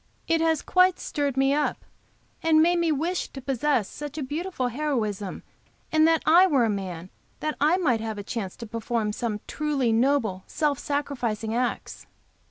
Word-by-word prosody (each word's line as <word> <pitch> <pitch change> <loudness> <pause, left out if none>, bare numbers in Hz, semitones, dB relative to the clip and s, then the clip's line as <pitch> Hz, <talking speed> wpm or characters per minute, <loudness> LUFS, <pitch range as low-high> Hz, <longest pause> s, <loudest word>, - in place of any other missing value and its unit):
It 330 0 +2
has 320 -2 +1
quite 365 0 +3
stirred 285 -3 -2
me 270 +1 +3
up, 295 0 -1 0.6
and 320 -1 +4
made 345 +2 +4
me 335 -1 +2
wish 330 +5 -1
to 270 - -9
possess 270 -3 0
such 295 0 -8
beautiful 300 -3 -2
heroism, 225 -8 -2 0.5
and 315 0 +5
that 325 -1 +2
I 350 +4 +7
were 275 -8 +3
a 220 - +1
man, 185 -3 -5 0.3
that 305 -1 -2
I 310 +5 +4
might 250 -12 +1
have 220 -1 -4
a 205 - -5
chance 200 -3 -4
to 235 - -8
perform 225 -1 -2
some 215 -2 -3
truly 285 -6 0
noble, 225 -6 +1
self 295 -3 0
sacrificing 250 -7 -2
acts." 245 +1 -3
275 Hz, 170 wpm, -26 LUFS, 225-310 Hz, 0.6 s, I